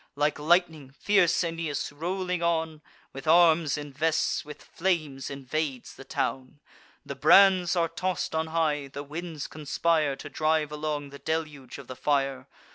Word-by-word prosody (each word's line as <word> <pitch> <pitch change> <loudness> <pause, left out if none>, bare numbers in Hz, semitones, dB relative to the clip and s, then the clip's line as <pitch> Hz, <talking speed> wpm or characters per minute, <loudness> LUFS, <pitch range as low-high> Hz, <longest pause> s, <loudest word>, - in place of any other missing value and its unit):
Like 145 +1 0
lightning, 160 -3 +2
fierce 180 +4 +2
Aeneas, 165 -4 -3
rolling 180 +3 -3
on, 160 -2 -1 0.3
With 135 +3 -9
arms 160 -3 +5
invests, 150 +2 -1
with 150 -1 -11
flames 155 -7 -2
invades 140 -1 -4
the - - -12
town: 135 +1 -3 0.5
The - - -5
brands 190 -3 +5
are 170 -1 +2
toss'd 175 +2 -3
on 160 0 -1
high; 155 -3 0
the 140 +1 -7
winds 155 0 -6
conspire 155 -1 0
To 140 - -9
drive 155 +1 0
along 150 -2 -4
the 140 - -10
deluge 150 -5 -4
of 140 - -10
the 130 - -8
fire. 135 -2 -1
155 Hz, 145 wpm, -27 LUFS, 145-165 Hz, 0.5 s, arms